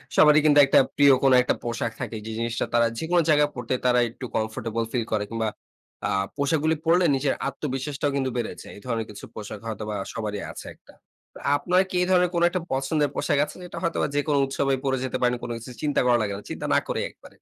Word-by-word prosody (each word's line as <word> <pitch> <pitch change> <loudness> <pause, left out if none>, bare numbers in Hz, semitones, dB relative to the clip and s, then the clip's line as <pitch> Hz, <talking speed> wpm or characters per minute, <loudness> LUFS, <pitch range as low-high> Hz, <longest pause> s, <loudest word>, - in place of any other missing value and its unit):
সবারই 150 0 +7
কিন্তু 145 -1 +6
একটা 135 - +5 0.2
প্রিয় 140 -1 +6
কোন 135 - +5
একটা - - +1
পোশাক 115 -1 -2
থাকে, 115 - -4
যে 110 - -5
জিনিসটা 115 0 -1
তারা 115 0 +4
যেকোনো 170 +4 +2
জায়গায় 150 -1 +4
পড়তে 125 +1 -3
তারা 125 0 +4
একটু 125 - -8
কমফোর্টেবল 115 +1 -2
ফিল 120 -3 0
করে 105 -1 +1
কিংবা 115 -1 -1 0.6
আ - - -2 0.3
পোশাকগুলো 155 +3 +1
পড়লে 175 +2 +4
নিজের 135 0 +1
আত্মবিশ্বাসটাও 140 +1 -3
কিন্তু 135 -1 0
বেড়েছে, 120 - -4
এই 100 - -12
ধরনের 115 -3 -2
কিছু 105 - -9
পোশাক 105 -1 -7
হয়তোবা 105 -1 -4 0.2
সবারই 105 -2 -4
আছে - - -9
একটা। - - -21 0.4
তো - - -10 0.2
আপনার 180 +5 +2
কি 185 - -5
এই 180 - +1
ধরনের 180 -1 +4
কোন 170 - +1
একটা 185 0 -2
পছন্দের 140 +2 +1
পোশাক 145 -4 +1
আছে, - - -11
যেটা 180 - -8
হয়তোবা 170 -3 0
যেকোনো 145 0 +1
উৎসবে 135 0 0
পড়ে 130 -1 +1
যেতে 130 0 -2
পারেন, 125 0 +3
কোন 120 - -4
কিছু 120 +3 -10
চিন্তা 150 -1 +1
করা 120 -1 +4
লাগে 100 -2 -1
না, - - -8
চিন্তা - - -5
না - - +5
করে - - -1
একবারে। - - -17
135 Hz, 215 wpm, -25 LUFS, 115-150 Hz, 0.6 s, সবারই